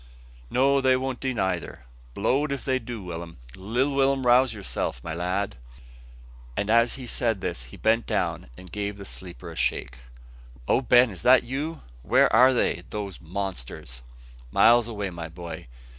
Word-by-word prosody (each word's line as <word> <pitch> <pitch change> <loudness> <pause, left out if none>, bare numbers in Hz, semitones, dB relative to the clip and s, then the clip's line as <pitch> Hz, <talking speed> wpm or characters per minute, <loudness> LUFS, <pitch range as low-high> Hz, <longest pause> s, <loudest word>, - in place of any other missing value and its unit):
"No, 135 +2 +3
they 130 -1 +4
won't 130 -1 -3
do 130 - -1
neyther, 95 - -3 0.3
blow'd 135 +8 +1
if 140 - -4
they 130 -1 +1
do. 115 -3 -7
Will'm, 85 -1 -7 0.2
little 120 +9 -1
Will'm! 135 -1 +2
rouse 125 +1 +5
yourself, 100 - -3
my - - -4
lad." 90 -2 -2 1.0
And 100 +1 0
as 115 +1 +4
he 130 -2 -7
said 115 -3 0
this 60 -8 -4
he 60 - -12
bent 115 +1 +2
down - - -1
and 90 - -12
gave 105 -1 -3
the 100 - -9
sleeper 90 -8 -8
a - - -10
shake. 65 0 -1 0.7
"O - - +3
Ben! 125 -1 +5
is 95 - -10
it 130 0 +6
you? 145 +6 -4 0.2
Where - - +3
are 130 +1 +7
they, 125 - +1
those 100 -2 -6
monsters?" 80 -9 -6 0.5
"Miles 120 - +5
away, 105 -4 -4
my 85 -1 -6
boy. 85 0 -8
110 Hz, 165 wpm, -26 LUFS, 90-130 Hz, 1.0 s, are